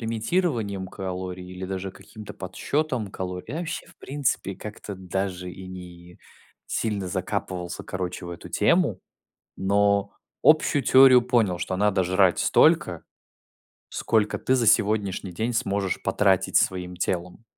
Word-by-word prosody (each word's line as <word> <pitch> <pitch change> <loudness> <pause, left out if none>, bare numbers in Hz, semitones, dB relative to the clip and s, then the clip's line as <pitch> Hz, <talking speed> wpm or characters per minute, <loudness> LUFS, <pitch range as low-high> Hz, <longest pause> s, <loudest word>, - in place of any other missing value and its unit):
лимитированием 115 - -1
калорий 90 -1 -5
или 90 +1 -7
даже 95 0 -4
каким-то 105 +1 -11
подсчетом 120 +3 -2
калорий. 90 -1 -5
Я 155 - -3
вообще, 170 +1 -5
в - - -19
принципе, 135 -8 -2
как-то 105 -1 -8
даже 90 0 -3
и 95 +1 -10
не 90 -1 -11 0.5
сильно 105 -4 -2
закапывался, 95 -1 -4
короче, 90 -1 -4
в - - -6
эту 85 - -9
тему. - - +2 0.6
Но 100 +1 +2 0.3
общую 155 -2 +5
теорию 130 0 +7
понял, 115 -8 +1
что 95 - -2
надо 100 -1 +2
жрать 95 0 +3
столько, - - +3 0.9
сколько 105 -2 0
ты 130 - +1
за 120 -3 +2
сегодняшний 100 -3 +2
день 110 +7 -2
сможешь 100 -5 -1
потратить 95 -2 +2
своим 90 -1 +1
телом. 90 +4 -3
95 Hz, 130 wpm, -25 LUFS, 90-110 Hz, 0.9 s, теорию